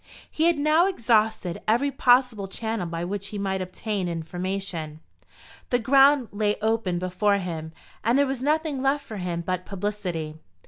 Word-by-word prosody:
He 320 - +1
had 340 -2 +4
now 305 +5 +4
exhausted 220 - +1
every 245 +6 +2
possible 245 -6 +3
channel 220 -1 -3
by 165 +1 -3
which 200 +2 -4
he 205 - -6
might 190 -1 -1
obtain 190 +1 -3
information. 170 -1 -4 0.7
The 245 - +3
ground 270 +1 +5
lay 210 0 0
open 220 -4 0
before 185 +3 +1
him, 165 -4 -5 0.3
and 235 +4 +3
there 285 - +4
was 265 -2 -3
nothing 300 -1 0
left 275 +2 +1
for 215 - -7
him 175 -2 -3
but 185 +1 -2
publicity. 180 -6 -4
205 Hz, 155 wpm, -25 LUFS, 180-250 Hz, 0.7 s, ground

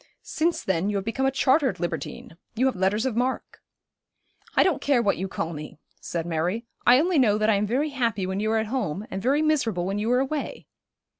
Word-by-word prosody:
Since 335 +2 -1
then 190 +1 0
you 205 - -2
have 195 - -3
become 265 +4 0
a - - +2
chartered 265 - +2
libertine. 175 -1 -5 0.2
You 250 +4 +1
have 265 - +1
letters 195 +5 +1
of 255 -4 -1
mark.' 250 +2 -2 0.9
'I - - +6
don't 360 -8 +1
care 280 -3 +3
what 205 -4 +1
you 190 - -2
call 165 -2 -4
me,' 150 -1 -8 0.2
said 165 -1 -4
Mary. 175 +7 -1 0.2
'I 245 +2 +8
only 345 -2 +2
know 210 -5 +4
that 215 +1 +2
I - - +4
am 205 +1 +1
very 275 +8 0
happy 230 -8 -1
when 190 +1 -2
you 215 +1 0
are 225 - +2
at 220 - 0
home, 210 - -3
and 190 - -4
very 280 +7 +2
miserable 230 - +1
when 195 +2 -2
you 220 +3 0
are 250 - +4
away.' 275 +2 -3
220 Hz, 225 wpm, -25 LUFS, 190-265 Hz, 0.9 s, I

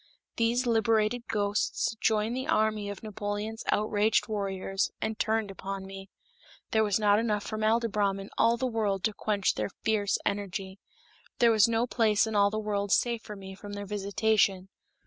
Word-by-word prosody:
These 235 +2 +1
liberated 225 0 +1
ghosts 205 +1 0
joined 220 +1 +1
the 260 +2 -3
army 215 -6 +1
of 200 0 -7
Napoleon's 210 +1 -4
outraged 215 +1 +2
warriors, 195 -2 -2
and 220 0 -3
turned 220 -2 0
upon 195 0 -6
me. 195 0 -9 0.6
There 220 0 +3
was 205 -1 +1
not 205 -1 +4
enough 210 -3 0
formaldybrom 215 -2 0
in 195 - -9
all 230 +1 +3
the 260 - -1
world 215 -6 -1
to 220 - +1
quench 205 -2 0
their - - -2
fierce 205 -3 +1
energy. 195 -1 -3 0.6
There 235 -1 +5
was 215 -1 +5
no 230 +1 +1
place 220 -4 +2
in 220 -1 -4
all 200 0 +5
the 215 - -3
world 205 -2 -2
safe 235 0 +2
for 210 - -9
me 190 -1 -9
from 205 +1 -9
their 205 0 -5
visitation. 200 -1 +1
210 Hz, 165 wpm, -29 LUFS, 200-220 Hz, 0.6 s, There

